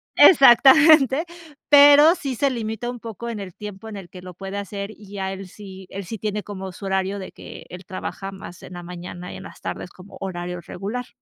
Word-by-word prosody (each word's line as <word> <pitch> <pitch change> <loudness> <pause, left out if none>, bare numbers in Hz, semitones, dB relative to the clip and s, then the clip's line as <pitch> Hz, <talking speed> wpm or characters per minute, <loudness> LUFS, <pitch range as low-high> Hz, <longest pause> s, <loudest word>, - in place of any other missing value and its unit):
Exactamente, 275 +1 +7 0.4
pero 290 +3 +8
sí 275 -7 -4
se 280 +4 +1
limita 225 -1 -4
un 245 -1 -6
poco 230 0 -7
en 225 -3 -5
el 185 -3 -8
tiempo 210 +1 -9
en 210 - -7
el 185 -3 -10
que 180 - -11
lo 180 0 -9
puede 195 +2 -7
hacer 200 0 -5
y 205 -2 -15
ya 190 -1 -3
él 195 0 -8
sí 190 -1 -12
él 195 0 -6
sí 225 +5 -6
tiene 210 0 -3
como 190 -2 -7
su 195 +2 -10
horario 190 +1 -1
de 190 - -8
que - - -11
él 180 +1 -10
trabaja 195 +1 -6
más 190 -2 -11
en - - -10
la 175 - -7
mañana 180 0 -8
y - - -8
en - - -10
las - - -12
tardes - - -5
como 185 +2 -14
horario 180 -2 -5
regular. 220 +8 -6
200 Hz, 220 wpm, -22 LUFS, 190-235 Hz, 0.4 s, pero